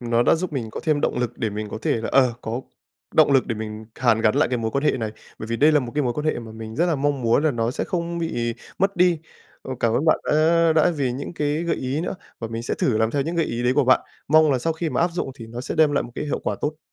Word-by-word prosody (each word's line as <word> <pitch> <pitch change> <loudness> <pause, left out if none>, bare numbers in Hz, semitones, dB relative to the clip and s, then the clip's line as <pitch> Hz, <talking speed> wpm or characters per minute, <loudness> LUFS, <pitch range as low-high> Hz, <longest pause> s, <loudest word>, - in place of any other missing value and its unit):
Nó 120 -1 +1
đã - - +4
giúp 175 0 -3
mình 120 -6 -3
có - - -6
thêm 155 -2 +2
động - - 0
lực 125 -1 -2
để 110 - -1
mình 105 +1 -4
có - - -5
thể - - +1
là, 110 - -4
ờ, 130 -3 +4
có 115 +3 -3 0.5
động 140 - +5
lực 135 - +4
để 115 - -2
mình 110 0 -6
hàn 115 -3 +2
gắn 110 -1 +3
lại - - +3
cái 125 -1 -1
mối 110 -1 -2
quan 140 +4 -1
hệ - - +5
này, 110 -4 -3 0.3
bởi 110 - -6
vì 115 +1 -2
đây 150 +4 +5
là 150 - +4
một 120 -3 -6
cái 150 - +1
mối 125 -3 0
quan 150 +3 -3
hệ 155 - +1
mà 115 -2 -9
mình 110 0 -8
rất 175 - +2
là 165 -4 +1
mong 140 -1 0
muốn 115 +6 +3
là 155 - +4
nó 115 -2 -1
sẽ - - -3
không 170 -1 -3
bị 120 -9 -2 0.2
mất 195 0 +1
đi. 175 -2 +4 0.4
Ờ, 130 - -5
cảm 115 - +2
ơn 140 - +1
bạn 155 - +4
đã 165 +2 +4
đã 160 +2 +4
vì 130 -4 0
những 140 +6 -5
cái 150 +2 -1
gợi 170 - 0
ý 130 +3 -2
nữa 175 - -3 0.2
và 115 - -5
mình 115 +1 -4
sẽ - - -2
thử 110 -4 +1
làm 110 0 +2
theo 140 -1 0
những 170 +3 -3
gợi 165 - +2
ý 120 +1 -3
đấy 125 +1 +3
của 145 - +3
bạn. 130 - +5 0.3
Mong 155 +1 +5
là 130 - +1
sau 165 +6 0
khi 160 0 -3
mà - - 0
áp 175 - +3
dụng 170 -6 -3
thì 115 -4 -10
nó 120 +2 -7
sẽ - - -4
đem 155 -2 +4
lại 145 - +1
một 120 - -9
cái - - -3
hiệu 145 - -2
quả - - -1
tốt. 155 +1 -2
135 Hz, 320 wpm, -23 LUFS, 115-155 Hz, 0.5 s, động